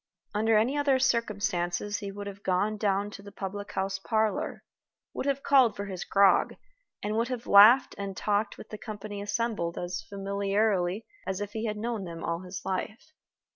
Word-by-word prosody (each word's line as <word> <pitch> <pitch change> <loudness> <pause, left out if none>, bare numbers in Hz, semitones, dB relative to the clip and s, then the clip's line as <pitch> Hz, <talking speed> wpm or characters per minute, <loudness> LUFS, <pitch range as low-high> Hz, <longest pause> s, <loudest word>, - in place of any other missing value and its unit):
Under 220 +1 +3
any 235 +6 +2
other 285 -2 +3
circumstances 205 -6 0
he 200 -1 -5
would 205 +1 -7
have 200 0 -8
gone 195 +3 +1
down 205 -1 0
to 200 - -9
the 200 0 -11
public 200 +1 -6
house 195 0 -1
parlor, 220 +1 -1 0.5
would - - -3
have 275 0 0
called 265 -5 +5
for 200 - -4
his 185 -3 -5
grog, 200 -1 +4 0.5
and 210 +1 -1
would 230 +1 +1
have 250 -2 -4
laughed 215 +6 +7
and 200 -1 -5
talked 205 0 0
with - - -11
the 215 - -7
company 205 -2 -6
assembled 205 -4 -2
as 175 0 -3
familiarly 200 0 0 0.2
as 190 0 -2
if 205 0 -4
he 220 +1 -3
had 210 -1 -2
known 225 -2 -3
them 165 -1 -7
all 170 0 -1
his 180 0 -7
life. 215 +10 -4
205 Hz, 180 wpm, -28 LUFS, 195-220 Hz, 0.5 s, laughed